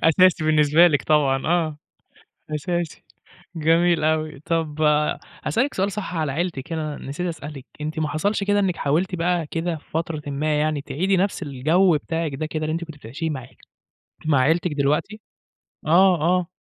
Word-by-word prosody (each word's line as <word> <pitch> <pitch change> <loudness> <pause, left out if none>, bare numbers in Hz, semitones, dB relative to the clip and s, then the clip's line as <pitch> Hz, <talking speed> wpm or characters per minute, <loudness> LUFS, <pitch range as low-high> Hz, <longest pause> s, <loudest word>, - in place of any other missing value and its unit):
أساسي 170 0 +4
بالنسبة 155 +2 +5
لِك 145 -4 +2
طبعًا، 140 -3 +2
آه. 160 -3 +1 0.8
أساسي، 175 +1 -3 0.5
جميل 165 +1 +3
أوي. 155 -2 0
طَب 155 -2 -1 0.6
هاسألِك 265 +6 0
سؤال 195 +1 0
صح 195 -3 -5
على 155 -4 -1
عيلتِك 165 -1 -3
هنا، 155 -2 -3
أنا - - -10
نسيت 175 +6 -3
أسألِك، 150 -4 -7 0.2
أنتِ 155 +1 -3
ما 155 - 0
حصلش 200 +7 0
كده 205 0 +2
إنِّك 190 -3 +1
حاولتِ 175 +6 0
بقى 170 -2 0
كده 165 +1 -2
في 155 - -14
فترةٍ 160 -1 -2
ما 150 +2 0
يعني، 155 -1 0
تعيدي 185 +7 0
نَفْس 190 0 0
الجَو 155 +5 +2
بتاعِك 160 -2 -3
ده 155 - -3
كده 155 0 -4
اللي 155 - -1
أنتِ 170 +1 -2
كنتِ 160 -3 -10
بتعيشيه 145 +8 -5
مع 130 -5 -5 0.8
مع 145 -4 +3
عيلتِك 160 +4 +2
دلوقتي؟ 150 +9 0 0.7
آه، 180 +4 +5
آه. 175 +2 +2
160 Hz, 165 wpm, -23 LUFS, 150-175 Hz, 0.8 s, بالنسبة